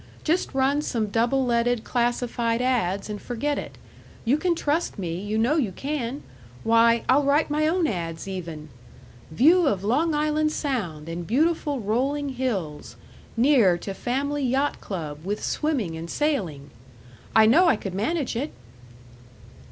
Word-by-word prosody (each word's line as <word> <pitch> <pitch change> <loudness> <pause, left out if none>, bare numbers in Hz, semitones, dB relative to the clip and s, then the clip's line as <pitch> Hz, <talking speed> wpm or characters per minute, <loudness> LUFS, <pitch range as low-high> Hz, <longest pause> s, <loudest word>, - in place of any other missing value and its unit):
Just 335 +4 0
run 270 +2 +2
some 225 -7 -2
double 240 +5 +1
leaded 235 -1 +1
classified 240 -1 0
ads. 225 -7 0
and 210 -1 -6
forget 280 +4 -2
it. - - -8 0.5
You 245 +5 +4
can 345 +3 +1
trust 320 +2 -1
me; 175 -2 -3
you 210 +2 -2
know 245 +8 +2
you 240 -11 0
can. 275 +3 -4 0.4
Why, 230 0 +4
I'll 270 +3 +5
write 290 +2 +2
my 305 +1 +2
own 345 +1 +1
ads., 170 - -3
even: 165 -5 -6 0.6
'View 315 - +4
of 200 -6 0
Long 300 +9 +1
Island 305 +1 +1
Sound, 195 - -3
and 165 0 -5
beautiful 290 +1 +1
rolling 270 +7 0
hills. 190 - -3 0.4
Near 230 -8 +4
to 195 +3 -6
family 280 +7 -2
yacht 265 +3 0
club, 155 -6 -6
with 205 +3 -3
swimming 260 - -1
and 165 +1 -7
sailing.' 180 - -2 0.6
I 220 - +7
know 325 +12 +5
I 330 - +5
could 195 -3 -6
manage 250 - -1
it." 275 +6 -3
240 Hz, 150 wpm, -25 LUFS, 195-290 Hz, 0.6 s, I